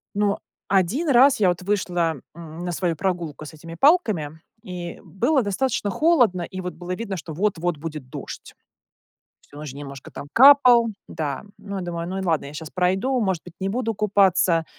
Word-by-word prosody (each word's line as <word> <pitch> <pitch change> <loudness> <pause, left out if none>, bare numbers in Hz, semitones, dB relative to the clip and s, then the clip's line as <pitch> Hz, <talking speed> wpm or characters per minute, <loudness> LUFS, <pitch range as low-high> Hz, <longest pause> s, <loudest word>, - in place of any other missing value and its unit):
Но 205 -1 +1 0.3
один 200 - +1
раз 265 -1 +6
я 190 - +4
вот 175 0 -2
вышла, 180 -4 0 0.2
м, 165 -1 -10
на 175 - -2
свою 170 -1 -1
прогулку 170 -4 -3
с 155 - -10
этими 165 +2 -10
палками, 205 - +2 0.2
и 180 -4 -7
было 250 +8 +1
достаточно 205 0 -1
холодно, 245 - +3
и 185 +2 -6
вот 180 0 -5
было 180 +1 -5
видно, 200 -4 -5
что 160 0 -7
вот-вот 175 -2 -1
будет 150 -4 -7
дождь. - - -9 0.9
Всю 145 - -17
ночь 150 -3 -7
немножко 140 -1 -9
там - - -8
капал. 250 -3 +7 0.2
Да. 145 -4 -4
Ну, 200 -1 -7
я 190 - -3
думаю, 170 -1 -4
ну 190 +1 -3
и - - -3
ладно, 160 -5 0
я 140 - -9
щас 155 0 -7
пройду, 190 +9 +1
может 190 -5 -1
быть, 175 - -12
не 190 - -1
буду 225 +2 -1
купаться, 190 -5 +3
185 Hz, 185 wpm, -23 LUFS, 165-210 Hz, 0.9 s, капал